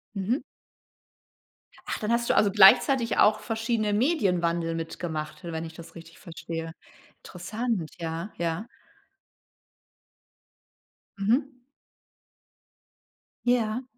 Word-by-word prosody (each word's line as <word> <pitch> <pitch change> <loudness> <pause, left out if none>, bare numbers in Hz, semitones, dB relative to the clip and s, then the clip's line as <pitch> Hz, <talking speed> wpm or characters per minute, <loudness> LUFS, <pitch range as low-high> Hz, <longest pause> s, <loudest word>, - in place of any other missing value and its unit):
Mhm. 205 - -1 1.4
Ach, - - -3
dann 215 0 -2
hast 235 0 +1
du - - +3
also 205 - +4
gleichzeitig 230 +5 +6
auch 215 0 +5
verschiedene 225 -2 -1
Medienwandel 180 - +1
mitgemacht, 160 -2 -5
wenn 165 -1 -4
ich 160 - -9
das 165 +1 -12
richtig 165 0 -13
verstehe. 165 -2 -7 0.4
Interessant, 190 0 -4
ja, 165 +4 -4
ja. 170 +4 -2 2.5
Mhm. 250 +5 0 1.8
Ja. 245 -1 +1
195 Hz, 90 wpm, -27 LUFS, 165-230 Hz, 2.5 s, gleichzeitig